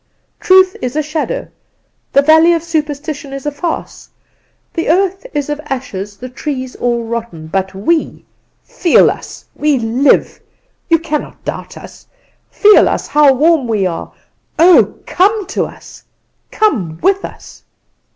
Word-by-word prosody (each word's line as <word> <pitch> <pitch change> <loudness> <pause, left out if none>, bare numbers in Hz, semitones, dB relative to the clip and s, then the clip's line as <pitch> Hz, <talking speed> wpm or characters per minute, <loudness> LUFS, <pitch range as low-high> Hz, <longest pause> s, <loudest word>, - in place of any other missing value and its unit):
Truth 375 0 +4
is 250 +1 -3
a 305 - 0
shadow; 310 +11 -3 0.7
the 280 - +5
valleys 320 +3 +5
of 330 - -3
superstition 300 -3 -4
are 275 +1 -6
a - - 0
farce: 325 +3 -5 0.6
the 330 - -2
earth 385 +6 +1
is 290 -6 -2
of 295 0 -4
ashes, 205 -8 -5
the 255 - -8
trees 260 0 -5
all 240 -1 -1
rotten; 225 -8 -5
but 190 +3 -3
we 315 - -1 0.4
feel 345 - +3
us - - -10
we 295 -2 +1
live! 240 +4 +1 0.5
You 330 - +5
cannot 315 -2 -5
doubt - - -6
us. - - -13 0.4
Feel 420 -1 +5
us - - -2
how 295 -1 +5
warm 305 -1 +2
we 210 -4 0
are! 175 -2 -4 0.5
Oh, 345 +2 +5
come 405 +3 +1
to - - -1
us! - - -13 0.5
Come 195 - 0
with 390 0 +2
us! - - -10
295 Hz, 140 wpm, -15 LUFS, 245-335 Hz, 0.7 s, the